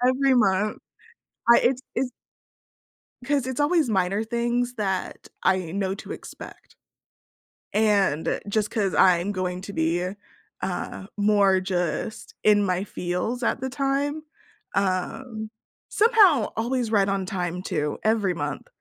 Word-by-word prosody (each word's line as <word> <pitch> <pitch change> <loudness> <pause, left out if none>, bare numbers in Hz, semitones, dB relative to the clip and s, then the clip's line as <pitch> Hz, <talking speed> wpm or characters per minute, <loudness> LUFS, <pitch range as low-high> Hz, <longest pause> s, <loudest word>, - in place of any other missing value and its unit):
Every 265 +1 +3
month, 210 -2 +2 0.7
I 235 - +9
it's 255 +1 +1
it's 250 +1 -1 1.1
'Cause 280 -1 +1
it's 260 +1 -4
always 300 -1 +3
minor 195 +1 +1
things 240 +2 -1
that 190 -3 -3 0.2
I 185 -3 +1
know 195 0 -1
to - - -9
expect. - - -10 1.0
And, 200 -7 +2
just 210 +1 0
'cause 200 -4 0
I'm 185 +1 +4
going 185 -2 -2
to 200 - -7
be, 175 +2 0 0.5
uh, 190 - -4
more 200 -2 +4
just 185 +3 -3
in 205 -1 +5
my 185 -1 0
feels 180 +7 -3
at - - 0
the 265 - -2
time, 280 +2 -1 0.5
um, 215 +4 -2 0.4
somehow 410 - +5
always 240 0 -1
right 200 -2 +3
on 195 -1 0
time 180 -1 -3
too 150 -6 -2
every 215 -4 +2
month. 150 -2 -4
205 Hz, 130 wpm, -25 LUFS, 185-245 Hz, 1.1 s, I